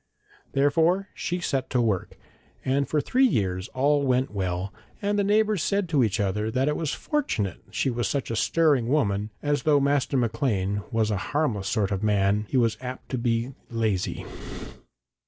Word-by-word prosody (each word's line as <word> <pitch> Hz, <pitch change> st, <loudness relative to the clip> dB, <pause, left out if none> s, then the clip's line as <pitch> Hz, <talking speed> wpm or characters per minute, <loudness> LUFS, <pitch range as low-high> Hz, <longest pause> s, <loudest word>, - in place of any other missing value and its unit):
Therefore 165 Hz, +8 st, +2 dB
she 180 Hz, +1 st, -3 dB
set 135 Hz, -6 st, -1 dB
to 125 Hz, -, +1 dB
work, 110 Hz, -6 st, 0 dB, 0.5 s
and 140 Hz, +1 st, +1 dB
for 150 Hz, -, +2 dB
three 260 Hz, -, +3 dB
years 95 Hz, -, -1 dB
all 145 Hz, +3 st, +2 dB
went 130 Hz, 0 st, +1 dB
well, 95 Hz, -1 st, -2 dB, 0.3 s
and 205 Hz, 0 st, 0 dB
the -, -, +3 dB
neighbours 210 Hz, -1 st, +2 dB
said 200 Hz, +2 st, 0 dB
to 145 Hz, -6 st, +3 dB
each 110 Hz, -1 st, 0 dB
other 105 Hz, +2 st, 0 dB
that 130 Hz, +4 st, 0 dB
it 150 Hz, -, +1 dB
was 155 Hz, -3 st, -2 dB
fortunate 265 Hz, -, -2 dB
she 135 Hz, -, 0 dB
was 120 Hz, -1 st, -1 dB
such 140 Hz, -4 st, -2 dB
a -, -, -1 dB
stirring 145 Hz, -2 st, +2 dB
woman, 105 Hz, -7 st, +1 dB
as 145 Hz, 0 st, +1 dB
though 150 Hz, -3 st, +4 dB
Master 140 Hz, 0 st, +1 dB
Maclean 110 Hz, -5 st, 0 dB
was 110 Hz, -2 st, +1 dB
a 105 Hz, -, 0 dB, 0.2 s
harmless 110 Hz, -11 st, 0 dB
sort 105 Hz, -4 st, 0 dB
of 95 Hz, -1 st, -1 dB
man 105 Hz, 0 st, +2 dB
he -, -, +1 dB
was 115 Hz, -3 st, +2 dB
apt 125 Hz, 0 st, -7 dB
to 130 Hz, -, -2 dB
be 120 Hz, +2 st, 0 dB, 0.2 s
lazy. 110 Hz, -5 st, -1 dB
125 Hz, 175 wpm, -26 LUFS, 105-150 Hz, 0.5 s, though